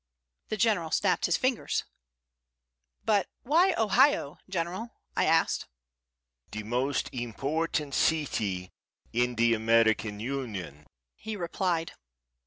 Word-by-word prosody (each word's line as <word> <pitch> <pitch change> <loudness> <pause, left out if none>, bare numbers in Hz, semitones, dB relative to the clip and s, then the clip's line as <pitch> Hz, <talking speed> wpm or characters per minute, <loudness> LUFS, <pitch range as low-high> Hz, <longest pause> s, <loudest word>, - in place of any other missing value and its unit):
The 215 - -2
General 200 -6 +2
snapped 185 +3 +2
his 175 - +2
fingers. 255 -2 0 1.2
"But 205 -4 +3 0.2
why 340 +7 +4
Ohio, 220 - +3
General?" 185 +6 -3 0.2
I - - +2
asked. - - +2 0.8
"The 110 0 -5
most 125 +5 0
important 140 +5 -2
city 105 - 0 0.4
in 120 +1 +1
the 115 +1 +4
American 110 -1 +2
Union," 105 - -5 0.3
he 220 0 -6
replied. 175 -2 -1
145 Hz, 100 wpm, -29 LUFS, -, 1.2 s, why